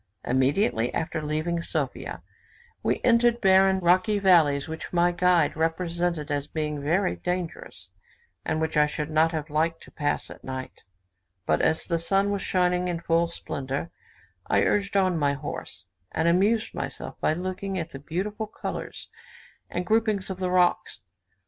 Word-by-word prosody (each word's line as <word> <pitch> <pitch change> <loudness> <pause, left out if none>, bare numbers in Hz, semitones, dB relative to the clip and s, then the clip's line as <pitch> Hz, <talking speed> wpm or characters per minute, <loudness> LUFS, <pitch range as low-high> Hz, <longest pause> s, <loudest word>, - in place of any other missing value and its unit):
Immediately 130 - +2
after 160 -1 -2
leaving 155 +3 -1
Sophia, - - -3 0.6
we - - 0
entered 235 0 +4
barren, 190 -1 +5
rocky 185 +4 +3
valleys, 165 -8 +4
which 160 0 -6
my 175 0 +3
guide 180 -1 +3
represented 165 -1 -1
as 145 0 -1
being 150 -2 -3
very 175 +7 +1
dangerous, 180 -1 -5 0.5
and 155 - -1
which 160 0 -1
I 150 0 +5
should 150 +1 -4
not 160 +1 +3
have 155 -2 -4
liked 165 +2 0
to - - -15
pass 145 -1 -2
at - - -12
night; 130 0 -6 0.6
but 80 - +2
as 160 - +2
the 170 -2 -1
sun 195 +4 +1
was 200 -1 -1
shining 180 -1 +1
in 175 -2 -2
full 170 0 +2
splendour, 140 -2 -4 0.6
I - - +3
urged 200 -1 +1
on 185 -4 +2
my 145 -1 +2
horse, 140 -8 -7 0.3
and 160 +1 0
amused 205 +6 +2
myself - - -6
by - - +2
looking 185 +3 -4
at 165 -1 -4
the 135 - -8
beautiful 205 +9 -3
colours - - -6 0.6
and 175 +1 -3
grouping 220 +1 +2
of 190 -1 -6
the 185 -1 -1
rocks. 180 -1 +1
170 Hz, 155 wpm, -26 LUFS, 155-185 Hz, 0.6 s, barren